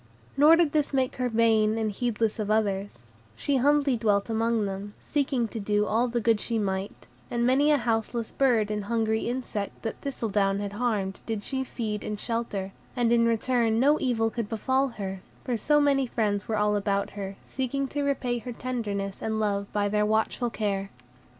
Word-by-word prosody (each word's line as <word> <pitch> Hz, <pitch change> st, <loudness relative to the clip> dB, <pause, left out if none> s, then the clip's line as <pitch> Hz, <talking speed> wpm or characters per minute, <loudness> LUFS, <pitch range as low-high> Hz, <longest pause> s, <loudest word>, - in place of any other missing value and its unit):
Nor 300 Hz, +3 st, +7 dB
did 330 Hz, -3 st, +3 dB
this 295 Hz, -2 st, 0 dB
make 260 Hz, -1 st, 0 dB
her 250 Hz, -1 st, 0 dB
vain 220 Hz, -1 st, +3 dB
and 220 Hz, -1 st, 0 dB
heedless 225 Hz, 0 st, -1 dB
of 210 Hz, -1 st, -2 dB
others; 200 Hz, -, -1 dB, 0.3 s
she 275 Hz, -, 0 dB
humbly 285 Hz, 0 st, +3 dB
dwelt 210 Hz, -1 st, +1 dB
among 225 Hz, -1 st, +1 dB
them, 200 Hz, +1 st, -5 dB
seeking 270 Hz, -5 st, 0 dB
to 225 Hz, -, -5 dB
do 210 Hz, 0 st, +1 dB
all 230 Hz, +4 st, +1 dB
the 240 Hz, 0 st, -1 dB
good 225 Hz, -1 st, +2 dB
she 230 Hz, +2 st, -2 dB
might; 195 Hz, -1 st, -3 dB, 0.2 s
and 235 Hz, 0 st, 0 dB
many 270 Hz, +4 st, +4 dB
a 300 Hz, -, +5 dB
houseless 230 Hz, -1 st, -1 dB
bird 230 Hz, -6 st, +2 dB
and 210 Hz, -1 st, -2 dB
hungry 220 Hz, 0 st, 0 dB
insect 240 Hz, -5 st, -4 dB
that 225 Hz, -, -4 dB
Thistledown 205 Hz, -7 st, 0 dB
had 205 Hz, 0 st, -4 dB
harmed 205 Hz, -4 st, -1 dB
did 220 Hz, -2 st, -2 dB
she 265 Hz, +4 st, -2 dB
feed 215 Hz, -5 st, -4 dB
and 210 Hz, -1 st, -4 dB
shelter, 220 Hz, -5 st, -3 dB, 0.2 s
and 240 Hz, -2 st, +2 dB
in 230 Hz, -1 st, +4 dB
return 230 Hz, -1 st, +2 dB
no 290 Hz, +4 st, +4 dB
evil 225 Hz, -3 st, +1 dB
could 230 Hz, -3 st, -3 dB
befall 260 Hz, +5 st, +1 dB
her, 195 Hz, -6 st, -6 dB, 0.2 s
for 250 Hz, -, -1 dB
so 295 Hz, +7 st, +3 dB
many 275 Hz, -2 st, +3 dB
friends 210 Hz, -3 st, -1 dB
were 220 Hz, -, 0 dB
all 210 Hz, 0 st, +2 dB
about 200 Hz, -1 st, 0 dB
her, 200 Hz, -1 st, -6 dB
seeking 270 Hz, +1 st, -2 dB
to 290 Hz, -, -2 dB
repay 260 Hz, -4 st, 0 dB
her 245 Hz, +1 st, -6 dB
tenderness 205 Hz, -6 st, -3 dB
and 220 Hz, 0 st, -1 dB
love 200 Hz, -2 st, -1 dB
by 205 Hz, -1 st, +1 dB
their 210 Hz, +1 st, +1 dB
watchful 220 Hz, +3 st, +1 dB
care. 200 Hz, -3 st, -2 dB
225 Hz, 190 wpm, -27 LUFS, 205-250 Hz, 0.3 s, Nor